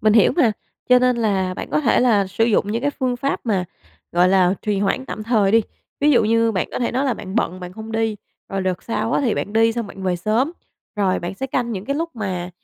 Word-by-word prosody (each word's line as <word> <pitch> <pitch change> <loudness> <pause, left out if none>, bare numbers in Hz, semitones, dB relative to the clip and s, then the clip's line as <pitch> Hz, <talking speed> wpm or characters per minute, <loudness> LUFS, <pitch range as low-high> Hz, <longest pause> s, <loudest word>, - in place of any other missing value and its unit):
mình 215 -1 +4
hiểu 220 - +5
mà, 240 -10 +4 0.4
cho 250 0 +7
nên 250 -1 +2
là 195 -5 0
bạn - - -6
có - - +2
thể 265 - +3
là 215 -6 +3
sử 200 +4 0
dụng 210 -2 +1
những 230 - -2
cái 285 - +1
phương 255 -4 -2
pháp 275 +3 -2
mà, 195 -5 +1 0.5
gọi 175 +1 +4
là, 185 -1 +4
trì 210 -2 0
hoãn 205 +7 0
tạm 215 - -5
thời 215 -4 +2
đi. 225 0 +5 0.4
Ví 295 +1 +4
dụ 240 -5 +4
như 230 +1 +2
bạn 185 - -1
có - - -2
thể 240 - -1
nói 260 +3 0
là 260 -4 +1
bạn 190 -1 -8
bận 185 -5 -1
bạn 180 0 -7
không 220 +2 -8
đi, 225 -1 0 0.3
rồi 195 0 -2
đợt 185 -1 -2
sau 230 0 -2
á, - - +2
thì 250 -6 +1
bạn 205 - -3
đi 225 +1 +4
xong 230 -2 -3
bạn 195 -1 -10
về 185 -1 0
sớm, 220 - 0 0.4
rồi 195 -3 +1
bạn 175 +3 -5
sẽ 265 - -4
canh 245 -3 -1
những 195 -1 -5
cái 280 +1 -2
lúc 330 +2 -2
mà, 185 -4 -3
220 Hz, 265 wpm, -21 LUFS, 195-245 Hz, 0.5 s, cho